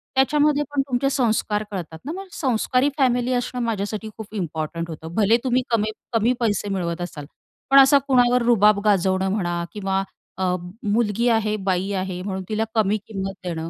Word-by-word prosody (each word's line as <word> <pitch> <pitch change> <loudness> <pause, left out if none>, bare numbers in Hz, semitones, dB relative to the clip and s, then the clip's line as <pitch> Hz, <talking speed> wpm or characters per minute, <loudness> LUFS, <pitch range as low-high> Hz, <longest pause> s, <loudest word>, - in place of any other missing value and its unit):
त्याच्यामध्ये 290 +2 +3
पण 285 -1 +1
तुमचे 265 +1 +1
संस्कार 220 -5 0
कळतात 170 -5 -6
ना. 295 - -3
मग 385 +3 -7
संस्कारी 255 +1 +1
फॅमिली 250 -2 +2
असणं 250 0 -2
माझ्यासाठी 215 -1 -3
खूप 220 -1 -9
इम्पॉर्टंट 165 -2 -3
होतं. 160 +1 -8
भले 220 +2 +4
तुम्ही 255 -1 +2
कमी 215 -2 +1 0.2
कमी 230 +2 +3
पैसे 205 -3 0
मिळवत 175 -3 -2
असाल. 155 -5 -6 0.4
पण 275 0 +8
असा 275 +1 +7
कुणावर 250 -2 +4
रुबाब 210 -3 +5
गाजवणं 190 -1 +2
म्हणा 175 -4 -1
किंवा 195 -2 -1 0.3
अ, 190 - -2 0.4
मुलगी 215 +2 +1
आहे, 220 -2 +1
बाई 190 0 -1
आहे 185 -1 -3
म्हणून 190 -1 -4
तिला 215 0 0
कमी 215 -1 +2
किंमत 195 -2 -4
देणं. 165 -2 -4
215 Hz, 165 wpm, -22 LUFS, 190-245 Hz, 0.4 s, पण